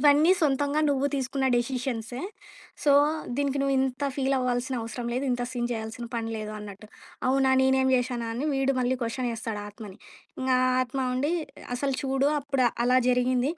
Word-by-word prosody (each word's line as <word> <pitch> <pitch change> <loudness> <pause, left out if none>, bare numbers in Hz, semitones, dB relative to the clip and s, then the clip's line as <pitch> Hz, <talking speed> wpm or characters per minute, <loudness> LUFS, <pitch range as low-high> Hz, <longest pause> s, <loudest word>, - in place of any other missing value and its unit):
ఇవన్నీ 295 +3 +6
సొంతంగా 285 -1 +1
నువ్వు 280 0 +1
తీసుకున్న 265 0 -1
డెసిషన్స్. 240 -1 -2 0.7
సో, 290 - +3 0.5
దీనికి 280 -1 0
నువ్వింత 270 0 +1
ఫీలవ్వాల్సిన 260 -1 0
అవసరం 230 +2 -5
లేదు. 255 +3 -1
ఇంత 245 0 0
సీన్ 240 -2 -2
చేయాల్సిన 225 +1 -4
పని 225 -1 -2
లేదు 215 0 -5
అన్నట్టు. 210 0 -9 0.4
అవునా 270 0 +3
నేనేం 265 0 +3
చేశాను 245 -2 0
అని 245 +5 -3
వీడు 270 0 +1
మళ్ళీ 255 +1 +1
క్వెషనేస్తాడు 230 -3 -3
ఆత్మని. 205 -2 -10 0.4
ఇంకా 260 -1 +2
ఆ - - +3
ఆత్మ 255 +2 -4
ఉండి 285 +6 0 0.4
అసలు 275 +1 -1
చూడు 270 +1 +1
అప్పుడు 275 -3 +1 0.2
అలా 250 +1 +5
జరిగింది. 250 +3 +2
255 Hz, 150 wpm, -27 LUFS, 240-275 Hz, 0.7 s, ఇవన్నీ